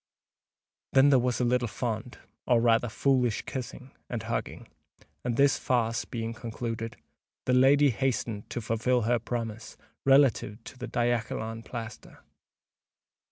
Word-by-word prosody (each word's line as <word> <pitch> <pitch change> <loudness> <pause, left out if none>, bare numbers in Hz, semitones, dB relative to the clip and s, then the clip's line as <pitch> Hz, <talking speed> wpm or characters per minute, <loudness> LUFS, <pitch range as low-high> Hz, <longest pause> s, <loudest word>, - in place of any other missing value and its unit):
Then 135 +1 +6
there 135 - +6
was 125 0 0
a - - +1
little 125 0 +1
fond—or 115 +2 -2
rather 115 0 +3
foolish 125 -1 +1
kissing 130 0 -7 0.2
and - - -3
hugging; - - -4 0.6
and 120 -2 -1
this 140 0 +4
farce 115 -2 0
being 115 -1 -4
concluded, 115 -1 -5 0.5
the 125 - +2
lady 135 +2 +5
hastened 115 -4 -2
to 120 - -4
fulfil 115 +3 +1
her 120 +2 +2
promise 115 -1 -5 0.3
relative 135 -5 +3
to - - -10
the 125 - -5
diachylon 115 -1 -1
plaster. 115 -2 -8
120 Hz, 125 wpm, -28 LUFS, 115-125 Hz, 0.6 s, Then